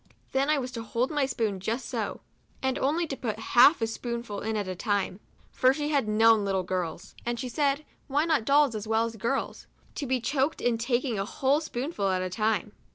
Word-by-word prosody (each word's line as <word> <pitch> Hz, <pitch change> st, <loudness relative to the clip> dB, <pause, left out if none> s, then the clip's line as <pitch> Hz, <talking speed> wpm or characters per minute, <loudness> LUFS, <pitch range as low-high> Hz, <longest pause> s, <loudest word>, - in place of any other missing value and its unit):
Then 270 Hz, +2 st, +1 dB
I 305 Hz, -, +4 dB
was 255 Hz, -2 st, -3 dB
to 235 Hz, -3 st, -5 dB
hold 235 Hz, +5 st, -1 dB
my 290 Hz, -3 st, +1 dB
spoon 220 Hz, -7 st, -1 dB
just 225 Hz, +7 st, -3 dB
so, -, -, -3 dB, 0.4 s
and 265 Hz, -1 st, 0 dB
only 315 Hz, +5 st, +1 dB
to 285 Hz, -, -4 dB
put 230 Hz, -5 st, -3 dB, 0.2 s
half 255 Hz, +2 st, +7 dB
a -, -, +4 dB
spoonful 235 Hz, -2 st, -4 dB
in 220 Hz, 0 st, -2 dB
at 205 Hz, -2 st, -2 dB
a 185 Hz, -, -2 dB
time, 200 Hz, 0 st, -1 dB, 0.3 s
for 255 Hz, +1 st, +3 dB
she 295 Hz, 0 st, -2 dB
had 280 Hz, -7 st, +1 dB
known 220 Hz, 0 st, +5 dB
little 195 Hz, -2 st, 0 dB
girls 180 Hz, -3 st, -4 dB
(and 240 Hz, 0 st, -2 dB
she 255 Hz, -, -3 dB
said, 285 Hz, +3 st, 0 dB, 0.2 s
why 290 Hz, +3 st, +1 dB
not 315 Hz, -8 st, +2 dB
dolls 280 Hz, +1 st, +4 dB
as 215 Hz, 0 st, -5 dB
well 225 Hz, +1 st, +2 dB
as 230 Hz, 0 st, -5 dB
girls?) 235 Hz, +5 st, -2 dB, 0.3 s
to 285 Hz, -, -4 dB
be 260 Hz, 0 st, +1 dB
choked 270 Hz, +5 st, 0 dB
in 235 Hz, -2 st, +1 dB
taking 240 Hz, -2 st, 0 dB
a 195 Hz, -, -1 dB
whole 275 Hz, +7 st, +1 dB
spoonful 255 Hz, -, -2 dB
at 185 Hz, -1 st, 0 dB
a 185 Hz, -, -3 dB
time. 215 Hz, 0 st, 0 dB
240 Hz, 220 wpm, -28 LUFS, 215-275 Hz, 0.4 s, half